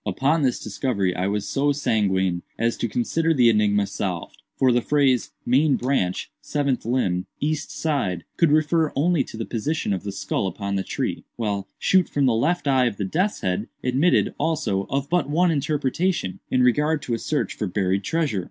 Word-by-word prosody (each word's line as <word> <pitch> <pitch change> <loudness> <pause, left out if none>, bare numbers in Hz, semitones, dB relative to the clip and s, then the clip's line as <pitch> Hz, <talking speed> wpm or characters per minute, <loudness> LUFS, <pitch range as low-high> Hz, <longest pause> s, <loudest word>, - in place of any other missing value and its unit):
"Upon 150 +4 +1
this 130 -3 +1
discovery 100 -4 -1
I 90 +1 -1
was 100 0 -2
so 145 +1 +1
sanguine 95 -10 +1 0.2
as 115 0 +1
to - - -1
consider 160 +9 0
the 120 -3 +5
enigma 105 -2 +2
solved; 90 -3 -5 0.2
for 130 -1 +4
the 120 0 +3
phrase 135 -2 +2 0.2
'main 140 +4 +3
branch, 125 -9 -1
seventh 140 -5 -1
limb, 95 -7 0
east 155 +1 -1
side,' 115 - -1
could 165 -4 +3
refer 155 +1 +2
only 155 0 +2
to 110 - -10
the 115 - -3
position 125 0 -2
of 95 - -2
the 100 - -5
skull 95 0 -2
upon 100 +2 -4
the 95 - 0
tree, - - -3
while 100 -4 -2
'shoot 185 -2 +3
from 140 -1 +1
the 125 - +3
left 150 +8 0
eye 130 -2 +4
of 105 -4 -3
the 100 - -2
death's 185 - -1
head' 95 +5 -1 0.2
admitted, 135 +8 +2
also, 145 -12 0
of 140 0 -1
but 165 -3 0
one 170 +4 +3
interpretation, 150 - -1
in 130 -1 +2
regard 150 +5 +2
to 120 - -3
a 115 - -1
search 150 -2 -1
for 105 - -3
buried 95 +1 0
treasure. 150 - 0
125 Hz, 190 wpm, -23 LUFS, 100-150 Hz, 0.2 s, the